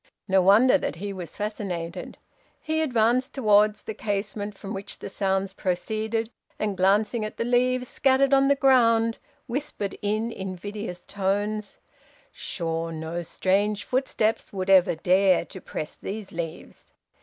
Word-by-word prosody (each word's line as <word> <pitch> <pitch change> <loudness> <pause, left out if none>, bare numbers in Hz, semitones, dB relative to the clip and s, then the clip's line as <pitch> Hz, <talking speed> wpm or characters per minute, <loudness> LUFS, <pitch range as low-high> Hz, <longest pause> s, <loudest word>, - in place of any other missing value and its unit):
No 190 -1 +4
wonder 225 +9 +6
that 150 - -3
he 200 +4 -5
was 180 -4 -8
fascinated; 185 -5 -4 0.4
he 315 0 -1
advanced 250 -1 +1
towards 210 -4 +3
the 220 - -5
casement 205 0 -3
from 200 +1 -6
which 195 +1 -6
the - - -7
sounds 195 0 -1
proceeded, 220 +5 -2 0.3
and 210 -2 -1
glancing 210 +5 +2
at 215 - -5
the 230 - -1
leaves 250 +1 +2
scattered 270 +2 +3
on 275 0 +5
the 280 - +4
ground, 230 -4 +4 0.3
whispered 245 -6 -4
in 215 +3 -1
invidious 190 -1 -6
tones, 205 +2 -2 0.5
'Sure 165 -1 -3
no 160 +2 -4
strange 200 +4 0
footsteps 240 -4 0
would 195 -1 -1
ever 185 -3 +6
dare 185 +2 +3
to 185 - -10
press 155 - -6
these 205 0 -6
leaves.' 165 -1 -7
205 Hz, 140 wpm, -25 LUFS, 190-230 Hz, 0.5 s, wonder